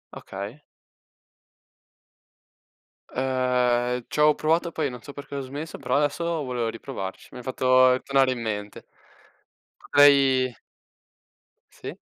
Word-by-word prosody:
Okay. 100 +9 -8 2.5
Uhm, 125 -2 0
c'avo 150 0 +3
provato 165 +2 +1
poi, 150 -4 -1
non 125 -1 -9
so 140 - -10
perché 140 0 -9
ho 140 - -2
smesso, 145 +5 -7
però - - -1
adesso 145 +3 0 0.2
volevo 125 -3 -2
riprovarci, 115 -4 -7
mi - - -10
hai - - -10
fatto 130 0 +4
tornare 135 -1 +3
in 120 - -4
mente. 105 -2 -5 0.9
Potrei 135 -3 +4 1.2
Sì. - - -8
130 Hz, 110 wpm, -25 LUFS, 125-140 Hz, 2.5 s, fatto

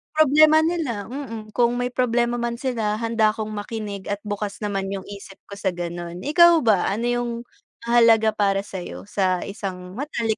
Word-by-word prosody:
problema 310 +1 +6
nila, 295 - -2
mm, 230 -6 -7
kung 240 +1 +2
may 245 0 -1
problema 240 -1 +1
man 235 0 -2
sila 230 -4 -1
handa 225 -2 +2
akong 215 -1 -4
makinig, 205 -1 -5
at 205 0 -3
bukas 205 0 -4
naman 195 -2 -2
yung 195 -1 -5
isip 200 -1 -10
ko 200 - -8
sa 190 -4 -1
gano'n. 175 0 -6
Ikaw 340 +3 +6
ba, 215 -5 +3
ano 220 +4 -1
yung 240 0 -1 0.5
mahalaga 230 -2 +5
para 200 -2 +1
sa'yo 190 -3 -7
sa 185 -3 0
isang 185 -2 -6
matalik 235 -6 -2
220 Hz, 170 wpm, -23 LUFS, 200-240 Hz, 0.5 s, problema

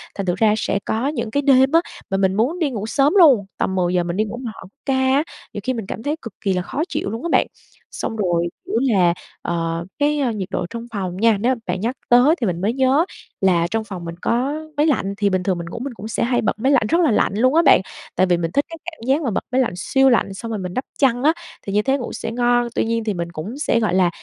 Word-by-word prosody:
Thành 195 - -3
thử 180 - +1
ra 215 -1 +4
sẽ 200 -1 -1
có 230 +5 -1
những 280 -7 -3
cái 285 - +1
đêm 270 -1 +5
á, 330 +1 +5 0.3
mà 195 - 0
mình 190 -1 +2
muốn 250 - 0
đi 315 -5 +1
ngủ 215 -4 -4
sớm 275 +6 +2
luôn, 270 - +6
tầm 190 - -1
10:00 180 -1 +1
mình 175 +2 -3
đi 215 - +3
ngủ, 220 +3 -6
mà 245 -3 -5
họ - - -11 0.2
ca 270 - +1
á 265 +3 +3 0.3
nhiều 205 - -5
khi 255 - 0
mình 225 -4 -4
cảm 220 - -6
thấy 295 +3 -1
cực 230 - -8
kì 195 - +1
là 180 - 0
khó 280 +11 -4
chịu - - -2
luôn 225 +6 -5
á 340 - -2
bạn. - - +3 0.4
Xong 225 - -4
rồi, 175 -5 0 0.2
kiểu - - -4
là, 190 -10 +3 0.3
ờ, 165 0 -2
cái 295 +1 +2 0.2
nhiệt 190 -3 -3
độ 180 - -1
trong 235 0 -6
phòng 185 -3 -3
nha, 225 0 +3
nếu 255 +3 +2
mà - - -13
bạn 185 +1 -2
nhắc 240 +4 -1
tới 250 +6 +6
thì 230 - +1
mình 175 -1 -2
mới 215 +4 +1
nhớ 265 +5 +3 0.4
là 175 -3 +3
trong 225 0 0
phòng 185 -5 -7
mình 170 - -6
có 250 +5 0 0.2
máy 295 - +3
lạnh, 200 -9 0
thì 205 -1 +2
bình 185 -1 0
thường 185 -2 0
mình 170 - -5
ngủ 230 - -6
mình 265 0 -5
cũng 215 0 -8
sẽ 225 - -1
hay 245 0 +1
bật 215 -1 -1
máy 265 +5 +2
lạnh 245 -6 +3
rất 340 - +3
là 315 -8 +3
lạnh 210 - +2
luôn 255 +7 +3
á 335 - +6
bạn. - - +7 0.3
Tại 185 - +4
vì 175 -1 +3
mình 165 -1 -2
thích 285 +9 +1
cái 330 - -8
cảm 320 -8 -8
giác 275 +4 +3
mà 255 -8 -1
bật - - -1
máy 260 +1 +3
lạnh 235 - 0
siêu 265 +9 +3
lạnh, 230 -5 +2
xong 230 +4 -6
rồi 220 - -2
mình 180 -1 -5
đắp 255 - -2
chăn 255 -2 +2
á, 310 - +5 0.3
thì 195 - -2
như 210 - +3
thế 270 +4 +1
ngủ 250 - -6
sẽ 225 - -4
ngon. 240 0 +2
Tuy - - +1
nhiên 230 0 -1
thì 215 -1 -1
mình 170 -1 -4
cũng 195 - -6
sẽ, 235 -5 +1
gọi 215 -5 0
là, 185 -2 +4
225 Hz, 285 wpm, -21 LUFS, 190-265 Hz, 0.4 s, bạn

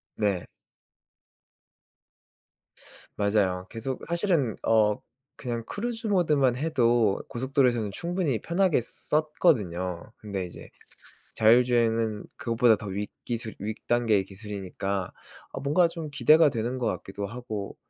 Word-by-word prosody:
네. 100 -4 0 2.7
맞아요. 100 -3 +1
계속 125 +4 -4
사실은 170 - +1
어 105 -2 +3 0.4
그냥 120 -3 -4
cruise 225 +1 -3
mode만 150 -10 +3
해도 120 -8 +2
고속도로에서는 125 -4 +1
충분히 170 - -1
편하게 175 - +2
썼거든요. 110 - 0
근데 100 -3 -4
이제 85 - -11 0.7
자율주행은 115 -2 +3
그것보다 115 -3 +3
더 105 - -9
윗 100 +2 -4
기술 115 -2 -4
윗 105 +2 -4
단계의 115 -5 +2
기술이니까 100 -2 -5 0.4
아 - - -5
뭔가 155 +5 +3
좀 165 -3 -6
기대가 155 +4 +5
되는 120 +2 -2
거 120 - -1
같기도 100 -1 -3
하고 110 -2 -6
115 Hz, 280 characters per minute, -27 LUFS, 105-145 Hz, 2.7 s, 기대가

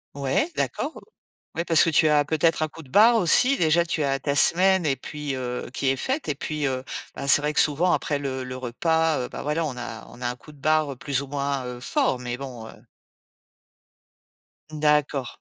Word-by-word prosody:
Ouais, 140 - -1
d'accord. - - -3 0.5
Oui, 170 - -2
parce 165 -2 +5
que 165 - +1
tu 155 +1 +4
as 150 -1 +3
peut-être 160 +2 +1
un 155 - 0
coup 165 +1 -13
de 135 - -17
barre, 220 - +5
aussi. 250 +7 +5
Déjà, 170 +1 +3
tu 170 -2 -2
as 135 -1 0
ta 140 +1 -2
semaine 185 +4 +5
et 135 -2 +1
puis 145 +2 -6
heu, 125 -1 -5
qui 135 - -1
est 135 - 0
faite. 265 - -3
Et - - 0
puis, 150 +1 -3
heu, 130 -1 -2 0.3
bah, 140 - -6
c'est 145 +2 +5
vrai 150 0 -1
que - - +3
souvent 165 +5 +2
après 145 - -1
le 135 -2 -4
le 130 0 -7
repas, 160 +6 0
heu, 125 - -4
bah, - - -8
voilà, 150 +3 -1
on 135 -4 -5
a 115 -2 -8
on 125 - -14
a - - -1
un 120 - -3
coup 150 - -16
de - - -18
barre 155 -1 0
plus 135 +1 -2
ou 140 - -7
moins, 140 -1 -3
heu, 125 0 -7
fort, 125 +1 0
mais 125 0 -5
bon, 125 -5 -8
heu - - -12 2.0
D'accord. 150 -3 +1
145 Hz, 220 wpm, -24 LUFS, 130-160 Hz, 2.0 s, parce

